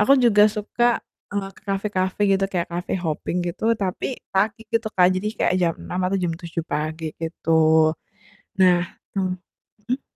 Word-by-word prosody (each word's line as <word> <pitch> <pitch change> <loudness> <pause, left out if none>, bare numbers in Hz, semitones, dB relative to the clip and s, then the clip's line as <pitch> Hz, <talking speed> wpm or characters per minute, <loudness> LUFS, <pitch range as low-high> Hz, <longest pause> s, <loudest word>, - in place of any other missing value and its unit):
aku 210 +6 +5
juga 210 -3 +6
suka, 215 +3 -2 0.5
eee, 200 -1 -2
ke - - -17
kafe-kafe 195 -1 -1
gitu 195 0 +3
kayak 175 -2 -1
cafe 175 +2 -3
hopping 160 +2 -2
gitu, 175 +4 -4
tapi 185 -2 -2 0.3
pagi 210 +4 +1
gitu 230 -1 +1
Kak, 180 -1 +6
jadi 190 +3 -1
kayak 180 - +2
jam 170 -2 +2
6 180 - -4
atau 195 - 0
jam 170 - 0
7 165 -1 -5
pagi 155 +1 -3
gitu. 160 -1 +3 0.7
Nah, 180 -2 +5 0.3
m 185 -2 0 0.5
mhm? 255 +3 -1
185 Hz, 160 wpm, -23 LUFS, 165-205 Hz, 0.7 s, juga